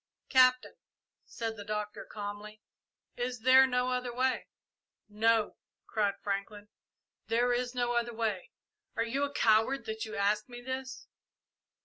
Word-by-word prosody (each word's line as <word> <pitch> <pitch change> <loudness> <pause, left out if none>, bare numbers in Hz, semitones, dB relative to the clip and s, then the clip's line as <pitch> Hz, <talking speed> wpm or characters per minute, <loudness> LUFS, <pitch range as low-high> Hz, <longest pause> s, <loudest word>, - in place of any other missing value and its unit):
"Captain," 255 -1 +4 0.5
said 225 -1 -4
the 205 - -7
Doctor, 210 0 -4
calmly, 210 +1 -7 0.6
"is 245 -1 -3
there 260 +2 +7
no 250 0 0
other 250 -1 -2
way?" 255 +2 0 0.6
"No," 220 +1 +1 0.3
cried 205 -2 0
Franklin; 205 +1 -4 0.6
"there 245 +2 +2
is 245 +1 -2
no 240 -1 0
other 240 0 0
way! 220 -5 -2 0.5
Are 230 - +1
you 270 +5 -1
a 285 - -6
coward 225 +2 +3
that 220 0 -4
you 220 0 -7
ask 210 +2 +1
me 240 0 -8
this?" 260 +1 -6
230 Hz, 135 wpm, -31 LUFS, 210-250 Hz, 0.6 s, there